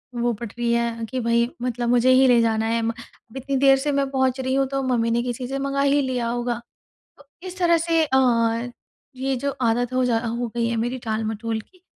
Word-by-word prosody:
वो 240 0 0
पट 220 0 -7
रही 235 -1 0
है 235 -1 -1
कि 260 - -3
भई 235 +1 +2
मतलब 245 -1 -2
मुझे 245 +1 +3
ही 260 +1 +6
ले 245 -1 +5
जाना 225 -1 +1
है। 230 +1 0
म 225 - 0
अब 230 +1 -14
इतनी 275 +1 -3
देर 270 0 +5
से 290 +2 -1
मैं 275 -1 0
पहुँच 265 -1 +1
रही 260 0 -1
हूँ, 270 0 +2
तो 275 0 -2
मम्मी 235 -3 +1
ने 235 +1 +1
किसी 245 0 -4
से 270 +2 -3
मँगा 275 0 -1
ही 280 +1 +3
लिया 255 -3 -2
होगा।" 240 0 -2 0.6
तो 285 - -17 0.2
इस 365 +1 -9
तरह 340 -2 +4
से 330 -1 +2
अ, 245 -4 +1 0.5
ये 265 +1 -1
जो 280 +3 -2
आदत 240 +2 +1
हो 255 0 +1
जा 235 -2 +2
हो 235 +1 -2
गई 235 - +1
है 235 - -1
मेरी 255 +2 -4
टाल-मटोल 220 +1 -2
की। 365 - -21
245 Hz, 230 wpm, -23 LUFS, 230-270 Hz, 0.6 s, ही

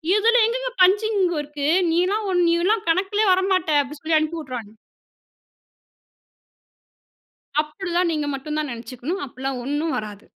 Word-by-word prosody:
இதுல 460 +3 +4
எங்கேங்க - - -2
பஞ்சிங்கு 395 -2 +2
இருக்கு? 290 -1 -4 0.2
நீலாம் 370 +6 +1
ஒ - - 0 0.2
நீலாம் 370 +6 +1
கணக்கிலேயே 390 +5 +1
வரமாட்ட" 375 -1 +1
அப்பிடி 285 +2 -8
சொல்லி 315 0 +1
அனுப்பிவுட்றாங்க. 300 -9 -5 2.9
அப்பிடி 310 +5 -7
தான். 355 -1 +2
நீங்க 300 -2 -2
மட்டும் 300 +3 -4
தான் 300 -2 -3
நினைச்சுக்கணும். 255 +9 -5
அப்பிடியெல்லாம் 260 0 -5
ஒண்ணும் 295 +4 -1
வராது. 210 -1 -7
330 Hz, 120 wpm, -22 LUFS, 285-385 Hz, 2.9 s, இதுல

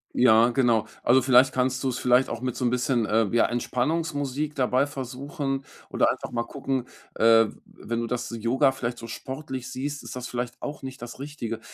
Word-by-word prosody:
Ja, 115 -1 +6
genau. 120 -4 +2 0.2
Also 130 +2 +5
vielleicht 130 +1 +5
kannst 130 +1 0
du's 130 -2 -1
vielleicht 125 +1 +3
auch 120 0 -4
mit 130 -1 -2
so - - -3
'n - - +3
bisschen, 125 -2 +1
äh, 110 +1 +2
ja, 120 - +5
Entspannungsmusik 145 +3 -1
dabei 130 +1 +2
versuchen 135 +1 -4 0.3
oder - - +2
einfach - - -3
mal 120 -1 -1
gucken, 130 0 -3 0.3
äh, 115 0 +6
w - - -9
wenn 115 0 -5
du 115 - -3
das 125 +1 -3
Yoga 130 +5 +2
vielleicht 120 -2 -4
so 115 - -8
sportlich 130 +1 -6
siehst, 140 +3 -4
ist - - -8
das 125 -1 -5
vielleicht 120 0 -5
auch 145 0 -5
nicht 130 -2 -8
das 120 +1 -8
Richtige. 135 -6 -5
125 Hz, 195 wpm, -26 LUFS, 120-135 Hz, 0.3 s, Ja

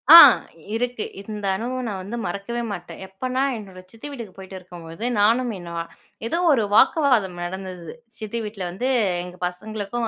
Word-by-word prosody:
ஆ - - +15 0.6
இருக்கு. 245 -1 -1 0.2
இந்த 210 0 -6
அனுபவம் 250 +4 -3
நான் 200 -3 -3
வந்து 215 +5 -5
மறக்கவே 200 +7 -3
மாட்டேன். 175 -1 -8
எப்பன்னா 255 +7 -2 0.2
என்னோட 195 -4 -10
சித்தி 225 +5 -9
வீட்டுக்கு 230 -9 -7
போய்ட்டு 190 0 -9
இருக்கும்போது, 175 +1 -10 0.2
நானும் 235 +4 +4
என்ன 170 -1 -8 0.5
ஏதோ 335 - 0 0.2
ஒரு 235 -5 +3
வாக்குவாதம் 235 - +4
நடந்தது. 180 -2 -6 0.3
சித்தி 220 +1 -4
வீட்ல 210 -3 -5
வந்து 220 +9 -2 0.4
எங்க 180 0 -9
பசங்களுக்கும், 215 +5 -4
210 Hz, 150 wpm, -23 LUFS, 185-235 Hz, 0.6 s, ஆ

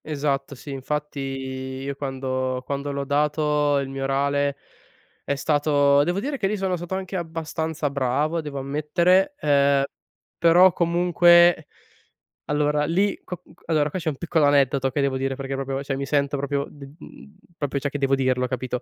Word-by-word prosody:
Esatto, 140 -2 -2
sì, 140 +3 -10
infatti, 150 +2 -4
io 135 0 -5
quando 130 -2 -3
quando 140 +1 -3
l'ho 140 0 -3
dato 150 0 +1
il 140 -1 -1
mio 135 0 -6
orale, 140 +1 0 0.7
è 140 - -1
stato 145 -1 +3
devo 175 +5 -1
dire 275 +5 -3
che 195 - +1
lì 210 +2 -1
sono 190 -2 -1
stato 175 +2 -5
anche 190 0 -5
abbastanza 160 -2 -3
bravo, 140 +5 0
devo 150 -2 -7
ammettere, 155 - +1
ehm, 140 -1 +3 0.6
però, 175 +2 +6
comunque 175 -1 +4 0.8
allora 150 0 +1
lì 195 +6 0
co 180 - -6
c - - -42 0.2
allora 155 -2 +2
qua 185 - -4
c'è 160 - -2
un 145 - -5
piccolo 165 -2 +1
aneddoto 140 -2 +3
che 145 - -2
devo 140 -1 0
dire 135 0 -2
perché 135 0 -4
proprio 135 0 -3
cioè, 135 -1 -3
mi 140 +1 -3
sento 140 -1 +1
proprio 140 0 -2
d 140 -1 -12
mhmm, 205 - -14 0.2
proprio, 140 -1 -2
cioè, 140 +1 -2
che 145 - -4
devo 135 -1 +2
dirlo, 130 -1 +1
capito? 125 0 -3
145 Hz, 170 wpm, -23 LUFS, 135-160 Hz, 0.8 s, però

